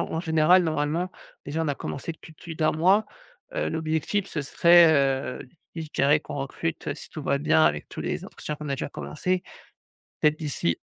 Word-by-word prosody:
en - - +1
en 160 - -1
général, 165 +2 +4
normalement, 160 +3 -1 0.3
déjà, 160 +3 -2
on 155 - -1
a 145 - 0
commencé 150 +5 -5
depuis 160 - -15
plus 165 +1 -9
d 160 - -4
'1 - - +3
mois. 190 +7 +4 0.5
Heu, - - 0
l'objectif, 160 +5 -1
ce 150 - -3
serait, 170 +3 +6
heu, 135 -3 0 0.3
je 160 -2 -5
dirais 145 +2 +4
qu'on 145 - -7
recrute, 145 +2 -3
si - - -12
tout 155 - -7
va 140 0 +1
bien 80 - +4
avec 75 -1 +1
tous - - -7
les - - -3
entretiens 150 - -6
qu'on 150 -1 -7
a - - -1
déjà 135 - -4
commencés, 180 +6 -2 0.8
peut-être 150 +1 +3
d'ici 135 - -1
155 Hz, 200 wpm, -26 LUFS, 140-165 Hz, 0.8 s, serait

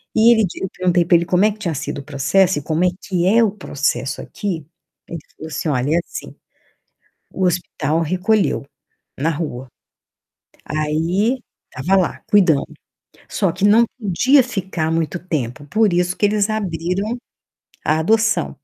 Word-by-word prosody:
e 225 +2 +6
ele 220 -2 +3
di 175 - -7
eu 190 - -2
perguntei 180 -1 +1
pra 170 - +4
ele 170 - -1
como 180 +3 +2
é 215 - +3
que 210 - -11
tinha 175 -6 -2
sido 145 0 -4
o - - -8
processo 160 +6 +2
e - - -11
como 160 +4 0
é - - +5 0.2
que 180 -2 0
é 230 +3 +5
o 210 - +2
processo 145 -8 -2
aqui, 170 -8 -5 0.4
ele 170 - -6 0.2
falou 160 - -8
assim: 155 - -3
"Olha, 140 +2 +1
é 170 - +3
assim, - - -8 1.0
o 190 - -1
hospital 165 -3 -1
recolheu, 185 +3 +1 0.5
na 160 +4 +1
rua, 145 -5 -4 1.0
aí, 165 +10 0 0.4
estava 185 +10 +2
lá, 180 - -3
cuidando. 175 -9 +3 0.6
Só 195 -4 +1
que 190 +3 -3
não 220 +3 +6
podia 255 +7 +4
ficar 190 -9 -3
muito 165 0 -1
tempo, 145 -6 -4
por 215 +6 +2
isso 180 +1 +1
que 205 - +3
eles 210 0 +1
abriram 195 +1 -2 0.7
a 155 +1 +2
adoção". 220 0 +2
180 Hz, 165 wpm, -19 LUFS, 155-205 Hz, 1.0 s, e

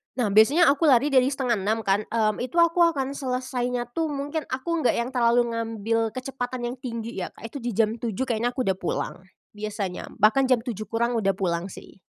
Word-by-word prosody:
Nah, 230 -6 0
biasanya 275 - +6
aku 300 +3 +1
lari 275 +2 +4
dari 260 -1 +5
5.30 225 -5 0
kan, 200 +2 +1
mmm, 215 -2 0
itu 255 +6 -5
aku 335 +1 +4
akan 285 -6 +3
selesainya 250 -2 -2
tuh, 325 +3 -1
mungkin 290 +1 -4
aku 320 +6 -2
nggak 270 - +2
yang 235 +2 -1
terlalu 240 -1 +2
ngambil 225 0 -1
kecepatan 255 -1 -4
yang - - -6
tinggi 230 -4 -5
ya, 180 - -3
Kak, - - -16
itu - - -6
di 240 -3 -4
jam 225 +1 +1
7.00 235 +1 -2
kayaknya 240 0 -1
aku 255 - 0
udah 190 -3 -1
pulang 175 - -2 0.4
biasanya, 210 -3 -5
bahkan 225 +5 +4
jam 245 -3 +2
7.00 215 -5 -5
kurang 235 +1 0
udah 195 -2 +1
pulang 175 -1 -1
sih. 195 - -13
240 Hz, 200 wpm, -25 LUFS, 220-265 Hz, 0.4 s, biasanya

